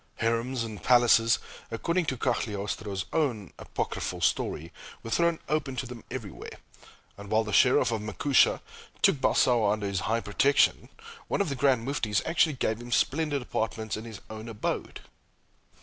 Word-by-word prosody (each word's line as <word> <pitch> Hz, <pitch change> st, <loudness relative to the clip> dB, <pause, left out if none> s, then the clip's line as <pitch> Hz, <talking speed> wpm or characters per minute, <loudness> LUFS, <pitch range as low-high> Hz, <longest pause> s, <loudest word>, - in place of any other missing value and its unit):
Harems 115 Hz, +2 st, -1 dB
and 110 Hz, -5 st, -7 dB
palaces, 120 Hz, 0 st, +5 dB, 0.3 s
according 170 Hz, +10 st, -1 dB
to 130 Hz, -, -1 dB
Cagliostro's 100 Hz, -4 st, -2 dB
own 120 Hz, -, -1 dB
apocryphal -, -, -4 dB
story, 80 Hz, +3 st, -1 dB, 0.3 s
were 115 Hz, -, -7 dB
thrown 170 Hz, +2 st, +2 dB
open 150 Hz, -4 st, -1 dB
to 130 Hz, -, -3 dB
them 125 Hz, -2 st, -9 dB
everywhere, -, -, -7 dB, 0.6 s
and 100 Hz, 0 st, -9 dB
while 110 Hz, +1 st, +3 dB
the 105 Hz, -, -5 dB
Scherif 125 Hz, +1 st, +4 dB
of 110 Hz, -2 st, -1 dB
Mecuca 110 Hz, +6 st, +2 dB, 0.4 s
took 195 Hz, -6 st, +5 dB
Balsao 115 Hz, -5 st, +3 dB
under 105 Hz, -1 st, -1 dB
his 100 Hz, -1 st, -1 dB
high 115 Hz, +1 st, +1 dB
protection, 140 Hz, +8 st, +2 dB, 0.4 s
one -, -, -1 dB
of 200 Hz, -, +1 dB
the 140 Hz, -, -2 dB
Grand 130 Hz, -3 st, +2 dB
Muftis 110 Hz, -8 st, 0 dB
actually 160 Hz, -1 st, +2 dB
gave 110 Hz, -4 st, -1 dB
him 120 Hz, 0 st, -9 dB
splendid 145 Hz, +2 st, +1 dB
apartments 110 Hz, -2 st, -3 dB
in 110 Hz, -, -7 dB
his 110 Hz, -4 st, -9 dB
own 110 Hz, +1 st, -8 dB
abode. 110 Hz, -2 st, -4 dB
115 Hz, 155 wpm, -28 LUFS, 110-135 Hz, 0.6 s, palaces